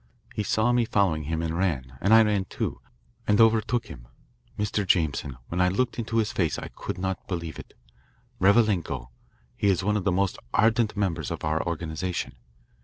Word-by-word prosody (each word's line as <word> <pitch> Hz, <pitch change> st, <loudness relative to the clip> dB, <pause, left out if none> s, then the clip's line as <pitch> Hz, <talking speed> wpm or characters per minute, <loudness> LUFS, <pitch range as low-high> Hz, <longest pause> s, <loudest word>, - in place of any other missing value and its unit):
He -, -, -2 dB
saw 110 Hz, +4 st, +2 dB
me 120 Hz, -1 st, +3 dB
following 95 Hz, -9 st, +1 dB
him 80 Hz, +2 st, -2 dB
and 80 Hz, 0 st, -2 dB
ran, 70 Hz, -9 st, -1 dB
and 100 Hz, -, +2 dB
I 110 Hz, 0 st, +8 dB
ran, 105 Hz, -3 st, +1 dB
too, -, -, -4 dB, 0.5 s
and 105 Hz, 0 st, +3 dB
overtook 115 Hz, +1 st, +3 dB
him. -, -, -11 dB, 0.5 s
Mr. 105 Hz, 0 st, 0 dB
Jameson, 75 Hz, -7 st, 0 dB
when 90 Hz, +2 st, 0 dB
I 90 Hz, -, +5 dB
looked 120 Hz, +6 st, -1 dB
into 115 Hz, 0 st, -2 dB
his 110 Hz, -2 st, +1 dB
face 85 Hz, -6 st, 0 dB
I -, -, -6 dB
could -, -, -6 dB
not 95 Hz, 0 st, -3 dB
believe 85 Hz, -4 st, -4 dB
it. -, -, -12 dB, 0.6 s
Revalenko 95 Hz, -, +2 dB, 0.5 s
he -, -, 0 dB
is 95 Hz, -2 st, +2 dB
one 105 Hz, +2 st, +2 dB
of 100 Hz, -, -2 dB
the 100 Hz, -, +2 dB
most 95 Hz, +1 st, 0 dB, 0.2 s
ardent 110 Hz, -1 st, +3 dB
members 85 Hz, -7 st, -1 dB
of -, -, -5 dB
our 80 Hz, +1 st, +1 dB
organisation. 85 Hz, +2 st, -3 dB
95 Hz, 180 wpm, -26 LUFS, 80-105 Hz, 0.6 s, I